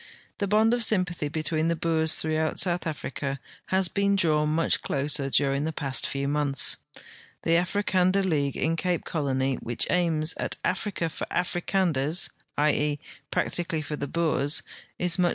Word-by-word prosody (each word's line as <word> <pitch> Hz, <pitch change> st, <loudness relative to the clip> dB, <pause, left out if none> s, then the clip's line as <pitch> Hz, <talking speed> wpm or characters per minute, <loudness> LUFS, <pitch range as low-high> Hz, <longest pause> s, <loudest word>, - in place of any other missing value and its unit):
The 200 Hz, -, 0 dB
bond 215 Hz, +3 st, +4 dB
of 245 Hz, -, +1 dB
S3unpathy 180 Hz, -9 st, +1 dB
betweeqthe 160 Hz, +2 st, -1 dB
Boers 160 Hz, -1 st, +2 dB
throughout 155 Hz, 0 st, -1 dB
South 175 Hz, -2 st, +3 dB
Africa 140 Hz, -2 st, -4 dB, 0.3 s
has 190 Hz, -1 st, +3 dB
been 200 Hz, +2 st, +1 dB
drawn 155 Hz, -5 st, +2 dB
much 165 Hz, +2 st, +1 dB
closer 140 Hz, 0 st, -1 dB
during 140 Hz, +1 st, +2 dB
the 160 Hz, -, -1 dB
past 140 Hz, -4 st, -1 dB
few 140 Hz, 0 st, -2 dB
months. 145 Hz, -1 st, +2 dB, 0.7 s
The -, -, 0 dB
Africander 185 Hz, +2 st, +2 dB
League 145 Hz, -6 st, 0 dB
in 165 Hz, +1 st, +1 dB
Cape 180 Hz, 0 st, -1 dB
Colony, 135 Hz, -4 st, -1 dB
which 120 Hz, 0 st, -1 dB
aims 165 Hz, -3 st, +1 dB
at -, -, -2 dB
"Africa 185 Hz, -2 st, -1 dB
for 160 Hz, -, -5 dB
the -, -, -3 dB
Africanders 175 Hz, -3 st, +1 dB
", -, -, -43 dB
i. 150 Hz, +1 st, +4 dB
e., 150 Hz, 0 st, 0 dB, 0.3 s
])ractically 165 Hz, -3 st, -1 dB
for 150 Hz, -, -3 dB
the 145 Hz, -, -4 dB
Boers, 155 Hz, -2 st, 0 dB, 0.3 s
is 175 Hz, 0 st, +1 dB
much 175 Hz, -1 st, +4 dB
160 Hz, 160 wpm, -26 LUFS, 145-180 Hz, 0.7 s, bond